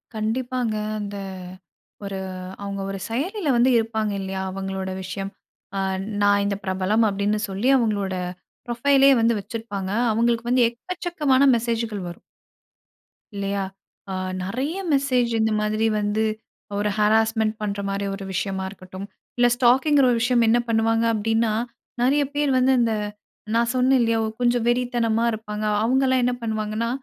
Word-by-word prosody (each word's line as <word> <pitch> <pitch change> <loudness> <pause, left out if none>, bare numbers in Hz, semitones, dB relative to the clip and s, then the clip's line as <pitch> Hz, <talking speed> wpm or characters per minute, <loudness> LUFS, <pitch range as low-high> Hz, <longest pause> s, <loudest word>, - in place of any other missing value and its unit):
கண்டிப்பாங்க. 240 +1 -1 0.2
அந்த 205 0 -5 0.9
ஒரு 195 -1 -4 0.4
அவுங்க 200 0 -4
ஒரு 195 - -4
செயலில 305 - -1
வந்து 245 +2 +4
இருப்பாங்க 220 -2 -1
இல்லயா! 190 0 -4
அவுங்களோட 190 0 -4
விஷயம் 195 +1 -5 0.5
ஆ - - +1 0.4
நான் 205 0 +4
இந்த 200 0 0
பிரபலம் 190 +4 +1
அப்டின்னு 205 +1 0
சொல்லி 195 +6 -1
அவுங்களோட 205 -6 0 0.5
புரொஃபைலே 270 +3 +4
வந்து 230 0 +3
வச்சிருப்பாங்க. 200 -2 -5 0.2
அவுங்களுக்கு 235 +1 +1
வந்து 250 -1 +4
எக்கச்சக்கமான 295 +1 0
மெசேஜ்கள் 230 -3 -2
வரும். 175 - -10 1.1
இல்லையா? 200 0 -1 0.5
அ - - -3 0.3
நிறைய 260 - -2 0.2
மெசேஜ் 255 -4 +2
இந்த 220 0 +2
மாதிரி 215 +1 0
வந்து 210 +1 0 0.5
ஒரு 205 +1 0
ஹராஸ்மென்ட் 220 +1 +2
பண்ற 205 -1 -2
மாரி 200 0 -2
ஒரு 195 - -8
விஷயமா 190 0 -2
இருக்கட்டும், 185 0 -9 0.3
இல்ல 245 0 +5
ஸ்டாக்கி 250 +4 +4
என்கிற 285 -2 +5
ஒரு 240 - +2
விஷயம் 245 -1 +3
என்ன 235 +2 +4
பண்ணுவாங்க 225 0 +2
அப்படின்னா 225 +1 +1 0.5
நிறைய 280 +4 +3
பேர் 290 -1 +2
வந்து 255 +1 +4
அந்த 230 -2 +2 0.6
நான் 235 +1 +2
சொன்னேன் 255 +1 +4
இல்லையா 230 -1 +2 0.2
கொஞ்சம் 240 -1 +2
வெறித்தனமா 240 -2 +1
இருப்பாங்க. 215 -1 -5 0.2
அவுங்கலாம் 260 +1 +3
என்ன 250 0 +2
பண்ணுவாங்கன்னா, 220 0 -2
225 Hz, 135 wpm, -23 LUFS, 205-245 Hz, 1.1 s, இல்ல